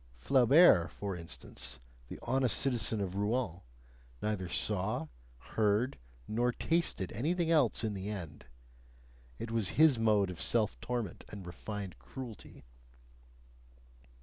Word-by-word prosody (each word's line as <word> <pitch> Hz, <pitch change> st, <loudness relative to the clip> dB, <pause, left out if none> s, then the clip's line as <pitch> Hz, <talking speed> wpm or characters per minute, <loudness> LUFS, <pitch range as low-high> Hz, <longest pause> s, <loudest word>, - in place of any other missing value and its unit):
Flaubert, 125 Hz, -, +6 dB
for 100 Hz, -2 st, -4 dB
instance, 85 Hz, -6 st, -6 dB, 0.3 s
the -, -, -7 dB
honest 130 Hz, -2 st, +2 dB
citizen 120 Hz, -4 st, 0 dB
of 95 Hz, -2 st, -3 dB
Rouen, 105 Hz, -2 st, -1 dB, 0.6 s
neither 105 Hz, -4 st, -2 dB
saw, 95 Hz, -4 st, -1 dB, 0.4 s
heard, 110 Hz, -, +2 dB, 0.3 s
nor 120 Hz, +3 st, +1 dB
tasted 165 Hz, -, 0 dB
anything 165 Hz, +8 st, 0 dB
else 145 Hz, -9 st, +3 dB
in 110 Hz, -2 st, -1 dB
the 100 Hz, +1 st, -4 dB
end; 80 Hz, -10 st, -7 dB, 0.9 s
it 115 Hz, -, -5 dB
was 115 Hz, -6 st, +1 dB
his 150 Hz, -6 st, +6 dB
mode 105 Hz, -4 st, +3 dB
of 90 Hz, -, -8 dB
self -, -, 0 dB
torment 120 Hz, -8 st, -3 dB
and 100 Hz, -3 st, -8 dB
refined 100 Hz, +2 st, -6 dB
cruelty. 125 Hz, -5 st, -9 dB
105 Hz, 120 wpm, -33 LUFS, 95-125 Hz, 0.9 s, Flaubert